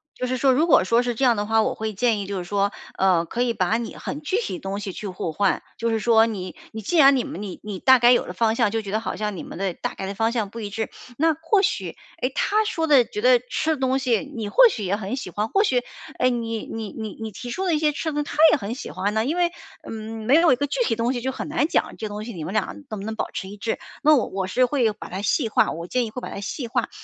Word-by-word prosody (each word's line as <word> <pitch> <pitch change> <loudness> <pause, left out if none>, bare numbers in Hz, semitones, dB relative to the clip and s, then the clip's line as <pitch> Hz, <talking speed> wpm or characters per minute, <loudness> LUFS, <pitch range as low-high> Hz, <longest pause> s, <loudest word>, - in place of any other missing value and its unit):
就 255 - -3
是 255 +1 -1
说 265 +1 +3
如 300 +6 +3
果 315 - +5
说 230 +5 +3
是 245 - -1
这 250 +4 -3
样 240 -3 +5
的 205 - -2
话， 220 +1 +3
我 - - 0
会 220 -1 -3
建 225 +1 +1
议 200 - -4
就 195 -1 -3
是 180 - -4
说， 200 +2 0 0.3
呃， 185 -3 +3
可 235 +8 -2
以 235 -2 0
把 200 +3 +1
你 235 - -5
很 290 - -5
具 320 +7 -1
体 190 - -4
的 - - -5
东 195 +1 -4
西 195 -2 -5
去 205 - -6
互 180 -3 -4
换， 195 +4 +1 0.2
就 230 0 -1
是 225 - +1
说 225 0 +5
你 190 -5 -5 0.2
你 220 - -6
既 335 - -1
然 275 -2 +7
你 250 - +1
们 - - -7
你 190 - -7
你 205 -2 -6
大 260 +3 +6
概 240 +1 +6
有 245 - +3
了 - - -7
方 225 -1 +1
向， 230 -4 +2
就 225 0 -1
觉 200 - -8
得 215 - +1
好 225 - -4
像 210 -3 -3
你 - - -6
们 170 - -9
的 190 -3 -1
大 - - -4
概 190 - -5
的 195 - -5
方 225 +2 +1
向 220 -5 -1
不 230 - -8
一 205 -2 -5
致， 220 +1 -3 0.3
那 320 0 +3
或 330 +6 +2
许， - - -1 0.2
哎， 255 -2 -1
她 430 +1 +1
说 325 -6 -1
的 265 -5 +6
觉 210 - -5
得 250 0 +6
吃 315 0 0
的 - - -10
东 265 0 +1
西 240 -6 +1
你 215 -3 -3
或 - - +7
许 220 - -4
也 190 +2 0
很 205 +3 -4
喜 255 - -5
欢， 210 +5 -2
或 395 - +3
许， 250 - +1 0.3
哎， 255 0 +3
你 230 -2 -3
你 220 -2 -6
你 220 -3 -6
你 220 -1 -4
提 245 +5 -7
出 375 - -3
的 335 - +2
一 - - +2
些 300 -1 +2
吃 315 +2 -3
的 295 0 -1
她 290 - -8
也 - - +4
很 220 -2 -4
喜 260 - -7
欢 195 +3 -2
呢。 220 +1 +1
因 310 +8 -1
为， 345 -1 +2 0.4
嗯， 220 0 -6
没 255 - +3
有 330 +1 +6
一 255 - +5
个 285 +3 -1
具 300 - -3
体 225 - 0
的 230 - -2
东 245 - +1
西 245 - -3
就 265 +1 -1
很 - - -5
难 300 0 +1
讲， - - 0
这 220 - -5
东 210 +1 -6
西， 235 - -7
你 165 -3 -6
们 190 - -5
俩 210 - +2 0.2
能 215 -3 -5
不 200 - -6
能 220 0 -4
保 - - -3
持 190 - -5
一 205 - -8
致， 225 +2 -2 0.2
那 305 0 +6
我 245 - +2
我 190 -1 -3
是 250 +6 +3
会 245 -5 +1
把 210 - -10
它 190 +2 -4
细 225 +5 +1
化， - - +2
我 170 +1 -6
建 245 +4 0
议 - - -6
会 250 +3 -7
把 - - -5
它 - - -6
细 240 +4 -4
化。 - - -1
225 Hz, 335 characters per minute, -23 LUFS, 205-260 Hz, 0.4 s, 然